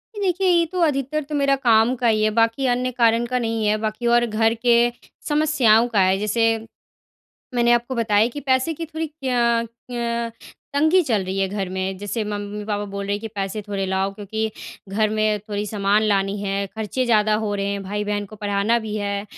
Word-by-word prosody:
जी, 415 - -5
देखिए 380 0 +1
ये 340 -1 +4
तो 365 - -3
अधिकतर 295 -1 0
तो 295 +1 -5
मेरा 275 -1 +3
काम 235 -1 +3
का 245 -1 0
ही 215 -1 +2
है 215 - +3
बाकी 230 +4 +1
अन्य 250 +1 0
कारण 235 -1 +2
का 250 +1 -1
नहीं 225 -2 -1
है, 215 - +2
बाकी 215 +2 -3
और 240 0 +4
घर 225 0 +1
के 235 +1 +3 0.4
समस्याओं 275 -7 +4
का 220 -4 0
है 190 +1 +3
जैसे 210 +2 0 1.1
मैंने 240 0 +3
आपको 240 +2 +1
बताया 220 -2 +3
कि 290 +4 -7
पैसे 265 +4 +1
की 330 +2 -6
थोड़ी 320 0 -4
क्य 245 -6 0 0.2
क्य 235 -1 -2 0.5
तंगी 315 +6 +4
चल 225 - 0
रही 190 +1 -3
है 195 -1 +1
घर 195 -2 -3
में, 190 0 -2
जैसे 205 +2 -3
मम्मी-पापा 205 0 -4
बोल 200 0 -5
रहे 200 - -2
हैं 205 - -4
कि 225 - -5
पैसे 195 +1 -3
थोड़े 195 -1 -2
लाओ 190 +1 0
क्योंकि 220 +2 -3 0.4
घर 215 +2 +1
में 215 -1 +1
थोड़ी 205 0 -2
सामान 205 0 +1
लानी 200 -1 +1
है, 200 0 -2
खर्चे 220 +4 -2
ज़्यादा 215 -2 +3
हो 210 -1 -1
रहे 200 0 -2
हैं, 200 0 -2
भाई-बहन 205 +1 -2
को 215 +2 -12
पढ़ाना 205 +2 +1
भी 220 -2 -5
है। 200 -1 -2
220 Hz, 205 wpm, -22 LUFS, 205-245 Hz, 1.1 s, ये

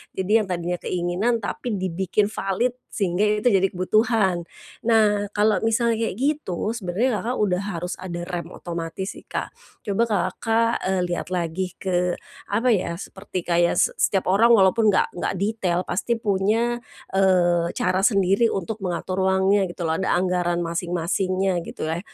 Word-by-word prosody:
Jadi 200 +4 +3
yang 215 - -2
tadinya 175 -1 -2
keinginan 185 +6 -1
tapi 225 +2 -3
dibikin 190 +2 0
valid, 195 +4 0 0.2
sehingga 195 +1 0 0.2
itu 245 - +4
jadi 195 -1 +4
kebutuhan. 190 -2 +1 0.4
Nah, 210 -3 +3
kalau 210 0 +3
misalnya 230 0 +1
kayak - - -4
gitu 255 - -1
sebenarnya 220 +2 -1
Kakak 245 +3 -2
udah 185 -1 0
harus 175 +2 -4
ada 175 -2 -5
rem 175 -1 -4
otomatis 170 +2 -5
sih, - - -21
Kak. - - -4 0.3
Coba 205 +1 +1
Kakak, 230 +2 +1
eee, 190 -1 +1
lihat 175 - -3
lagi 180 +1 -2
ke, 180 -2 0 0.3
apa 230 +5 +2
ya, 180 -5 0
seperti 190 0 -6
kayak 170 0 +2
se - - +3
setiap 190 -2 +2
orang 230 +4 +6
walaupun 215 +2 +4
nggak 205 - +3
nggak 175 - -3
detail 195 -4 0
pasti 230 +7 -1
punya, 220 +3 0 0.3
eee, 180 -3 +3
cara 185 +1 +1
sendiri 195 +1 +3
untuk 215 +1 -3
mengatur 185 0 -1
uangnya 190 +1 +3
gitu 175 0 -6
loh, 160 -1 0
ada 190 - +1
anggaran 175 -1 0
masing-masingnya 180 +2 -1
gitulah. 160 +2 -3
190 Hz, 150 wpm, -23 LUFS, 175-215 Hz, 0.4 s, orang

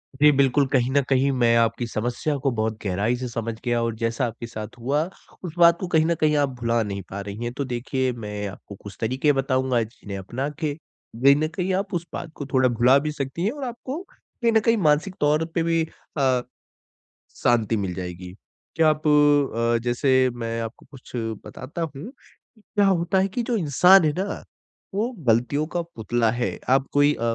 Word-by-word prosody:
जी 150 +2 +6
बिल्कुल, 140 0 +3
कहीं 125 -2 +1
न 140 +1 +4
कहीं 135 +1 +3
मैं 120 -3 +3
आपकी 115 +1 +1
समस्या 120 +7 -2
को 135 - +3
बहुत 110 -2 -1
गहराई 100 +6 0
से 125 +1 -4
समझ 115 -1 -3
गया 120 -1 +1
और 115 -1 -2
जैसा 115 +3 -1
आपके 115 0 -6
साथ 110 0 -8
हुआ 140 +6 +1 0.4
उस 175 -4 -5
बात 170 -1 +6
को 185 - -3
कहीं 160 -2 +3
न 170 +1 +1
कहीं 150 -1 +3
आप 140 -1 +2
भुला 115 0 +1
नहीं 100 -1 -4
पा 100 - -5
रही 100 +3 -6
हैं। 120 - -2
तो 140 +2 -3
देखिए 130 +1 -1
मैं 105 -3 -5
आपको 100 +1 -10
कुछ 100 - -10
तरीके 130 +6 +2
बताऊँगा 130 -2 +1
जिन्हें 105 -3 -8
अपना 120 +9 -4
के 150 -3 -1
कहीं 140 -3 +1
न 155 +1 0
कहीं 185 +1 -1
आप 195 +1 -2
उस 175 -1 -2
बात 165 - -6
को 145 - -6
थोड़ा 130 -1 +4
भुला 120 +3 +4
भी 150 +1 -3
सकती 140 +3 -4
हैं। 215 - +1
और 285 +1 -7
आपको 260 +5 -5
कही 235 -1 -3
न 225 - +5
कही 230 +2 +3
मानसिक 165 +6 +1
तौर 150 +2 +3
पे 165 - +2
भी 165 0 +2 0.4
अ, 130 -3 +2 1.0
शांति 115 -2 +2
मिल 95 -3 -2
जाएगी। 90 0 -7 0.4
क्या 160 -1 +4
आप 155 0 -1
अ, 145 -6 +3
जैसे 130 +1 +2
मैं 115 -1 -3
आपको 115 +1 -7
कुछ 135 -3 -14 0.3
बताता 135 +6 -7
हूँ 195 - -8 0.5
क्या 205 -1 0
होता 180 0 +2
है 190 - +2
कि 215 +5 -3
जो 235 +1 -1
इंसान 180 +3 +5
है 150 - +3
ना 200 +1 -3 0.5
वो 220 +4 +1 0.2
गलतियों 125 +6 +2
का 175 - 0
पुतला 120 -7 -1
है। 120 +1 -2
आप 135 +1 +4
कोई 145 +1 +4
अ, - - -9
135 Hz, 200 wpm, -24 LUFS, 115-155 Hz, 1.0 s, जी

